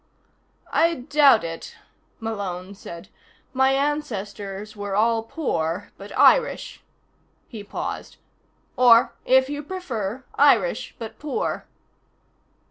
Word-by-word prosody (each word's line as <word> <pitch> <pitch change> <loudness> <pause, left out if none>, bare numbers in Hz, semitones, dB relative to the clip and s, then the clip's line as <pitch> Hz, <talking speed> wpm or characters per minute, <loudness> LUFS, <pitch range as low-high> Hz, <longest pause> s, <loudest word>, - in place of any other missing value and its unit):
"I 335 0 +3
doubt 280 - +4
it," 165 0 -7 0.4
Malone 200 -4 -4
said. 170 -3 -10 0.4
"My 265 0 +3
ancestors 210 -8 -3
were 205 -1 -4
all 225 +2 +3
poor 205 - -3
but 200 +1 -11
Irish." - - +3 0.7
He 220 -4 -8
paused. 205 - -6 0.6
"Or, 240 -2 +6
if 260 0 +5
you 290 +1 -4
prefer, 265 - -5
Irish, 250 -5 +3
but 225 -1 -8
poor." 295 -2 -3
225 Hz, 100 wpm, -23 LUFS, 200-275 Hz, 0.7 s, Or